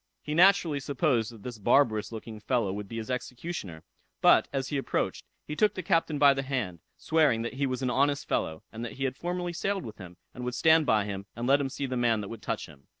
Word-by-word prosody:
He 150 - -3
naturally 175 -3 +5
supposed 135 -5 0
that 110 -4 -14
this 120 -3 -7
barbarous 110 -1 +3
looking 110 -1 -7
fellow 115 -4 0
would 105 0 -5
be 115 - -7
his 115 +3 -4
executioner; 125 - -5 0.4
but, - - +5
as 135 -1 -2
he 145 - -1
approached, - - -2 0.2
he 150 - -5
took 210 +5 +2
the 185 - -4
captain 165 -4 +1
by 140 -1 +6
the 135 - -2
hand, 125 -11 -3 0.2
swearing 150 -8 +2
"that 120 - -4
he 140 +1 -1
was 130 0 -3
an 125 - +1
honest 140 +2 +1
fellow, 80 0 -1
and 115 +1 -7
that 120 - -5
he 135 - -5
had 130 -1 -1
formerly 175 +2 -3
sailed 195 +2 -2
with 110 - -9
him, 90 -2 -10 0.2
and 125 - -7
would 125 0 -3
stand 160 +2 +4
by 110 -4 +3
him; 100 -1 -5
and 120 +1 -4
let 140 +2 +4
him 135 - -1
see 140 +1 -4
the 130 -1 -3
man 115 -3 +2
that 100 - -6
would 115 -2 -8
touch - - -3
him." 70 -3 -17
130 Hz, 245 wpm, -28 LUFS, 110-145 Hz, 0.4 s, by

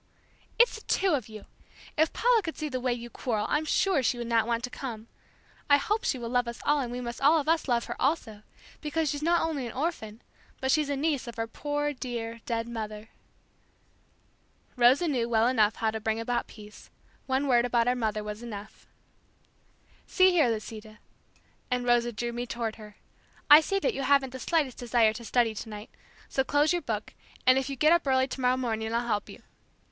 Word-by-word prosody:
"It's 475 +1 +5
the 440 - -8
two 385 -3 +2
of 255 -7 -2
you! 215 -1 -10 0.5
If 315 +1 +2
Paula 480 -2 +3
could 325 -4 -6
see 305 -1 -3
the 255 -2 -3
way 250 0 0
you 240 0 -5
quarrel 220 -4 -2
I'm 300 +1 0
sure 365 0 +2
she 245 0 0
would 240 - -4
not 230 -1 +1
want 235 0 -1
to 250 - -4
come. 225 -2 -7 0.6
I 285 - +7
hope 425 +9 -1
she - - +1
will 235 -2 -5
love 245 0 +1
us 235 - -6
all 295 0 +3
and 245 -3 -3
we 245 - -4
must 235 -1 -6
all 305 +4 +5
of 295 - -4
us 325 -1 +1
love 240 -2 +1
her - - -5
also, 255 -8 -1 0.4
because 310 0 -1
she's 290 -1 -4
not 340 +2 +2
only 295 -6 -2
an 230 - -8
orphan, 250 -7 -4 0.4
but 265 0 0
she's 300 -1 +2
a 285 - 0
niece 285 -2 -1
of 235 -1 -8
our 225 - -1
poor 290 +5 -2
dear, 235 -3 -5
dead 230 -1 -2
mother." 215 -2 -6 1.7
Rosa 255 +7 +4
knew 245 -6 0
well 235 +2 +2 0.2
how 220 -1 0
to 220 - -4
bring 220 +1 -1
about 240 +1 -2
peace. 210 -1 -14 0.4
One 265 +2 0
word 240 -2 +4
about 240 -1 +1
our 250 - +4
mother 215 -4 -2
was 210 +1 -6
enough. 215 -3 -9 1.2
"See 375 0 +4
here, 315 -8 +3
Lisita," 215 -1 -6 0.7
and 250 -1 -1
Rosa 240 0 +2
drew 235 +2 -4
me 240 +1 -4
toward 230 -2 -4
her, 210 -1 -12 0.6
"I 300 +2 +11
see 390 +5 -1
that 440 +4 0
you 275 - -4
haven't 275 -1 +2
the 260 - -7
slightest 295 -4 0
desire 235 -3 +3
to 235 - -8
study 235 -1 +1
tonight, 215 0 -8 0.4
so 265 - 0
close 290 +4 +2
your 350 - 0
book, 215 -6 -4 0.3
and 255 +1 +6
if 265 0 -4
you 275 - -3
get 305 +5 +4
up 340 -4 +1
early 260 0 +3
tomorrow 255 -1 0
morning 220 -3 -2
I'll 235 +1 0
help 210 -3 -2
you. - - -12
245 Hz, 205 wpm, -28 LUFS, 230-290 Hz, 1.7 s, I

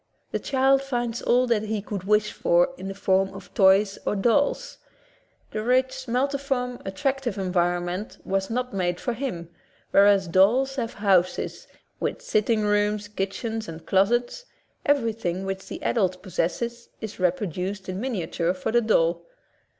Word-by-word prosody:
The - - -1
child 270 0 +3
finds 240 -3 -2
all 250 +1 +3
that 230 -4 +1
he 215 0 -2
could 200 -2 -6
wish 210 +1 +2
for 175 +5 +3
in 195 - -7
the 195 - -5
form 190 0 +2
of 195 -1 -11
toys 195 +1 +4
or - - 0
dolls. 280 - +1 0.7
The 215 - -3
rich, 260 +2 +1
multiform, 255 0 -1
attractive 240 +4 -2
environment 175 +1 -1
was 195 0 -1
not 250 +2 -2
made 180 -2 -1
for 245 - -2
him, 220 -10 -4 0.4
whereas 200 -1 +5
dolls 240 +10 +3
have 235 -2 -3
houses, 190 -3 +1 0.3
with - - -2
sitting 215 - +1
rooms, 210 0 +1
kitchens, 215 +3 -3
and 160 0 -9
closets 240 - +1 0.2
— - - -42
every 265 -6 +3
thing 190 -3 -3
which 195 0 -4
the - - -6
adult 185 -5 0
possesses 235 +6 -2
is 215 -3 -7
reproduced 185 +1 -1
in 185 0 -4
miniature 185 -7 -1
for 185 - -3
the 240 +1 +4
doll. 170 -6 +2
210 Hz, 150 wpm, -25 LUFS, 190-245 Hz, 0.7 s, whereas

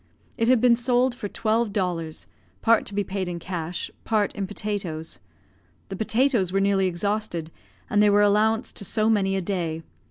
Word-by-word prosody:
It 230 - 0
had 255 -1 +5
been 240 0 +5
sold 245 +1 +2
for 225 -4 -5
twelve 220 +1 0
dollars, 175 -6 -2 0.4
part 230 0 +4
to 200 - -6
be 205 - +1
paid 190 -1 -3
in 175 -1 -4
cash, 170 -1 -4
part 215 -2 +1
in 195 -2 -3
potatoes; 195 -6 -4 0.7
the 195 - -4
potatoes 225 -2 +1
were 195 - +1
nearly 195 -1 +2
exhausted, 180 -2 -2 0.4
and 210 - +2
they 210 - +5
were 205 0 +5
allowanced 215 +3 +2
to - - -2
so 215 +3 +2
many 195 -3 +2
a 190 - 0
day. 170 -4 -3
205 Hz, 180 wpm, -25 LUFS, 185-220 Hz, 0.7 s, had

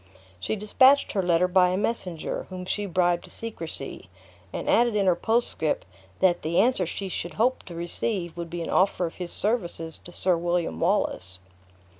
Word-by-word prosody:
She 95 - -2
dispatched 260 +7 +4
her 195 - 0
letter 180 0 +3
by 180 0 +4
a 185 - 0
messenger, 190 -6 -2
whom 185 -1 -6
she 205 +2 -2
bribed 175 -1 +1
to - - -14
secrecy; 165 - -6 0.4
and - - -5
added 235 -1 +3
in 200 -2 +2
her 180 -2 +4
postscript, 240 - 0 0.4
"that 180 -2 +3
the 165 +2 +1
answer 205 -4 +2
she 195 +3 -4
should 175 -3 -5
hope 250 +6 +1
to 175 - -9
receive 175 +1 -3
would 170 -1 -6
be 170 0 -4
an - - -5
offer 185 -1 +2
of 165 - -5
his 180 -2 -3
services 175 -7 0
to 175 - -12
Sir 180 0 +2
William 175 0 -1
Wallace." 130 - 0
180 Hz, 180 wpm, -26 LUFS, 170-210 Hz, 0.4 s, dispatched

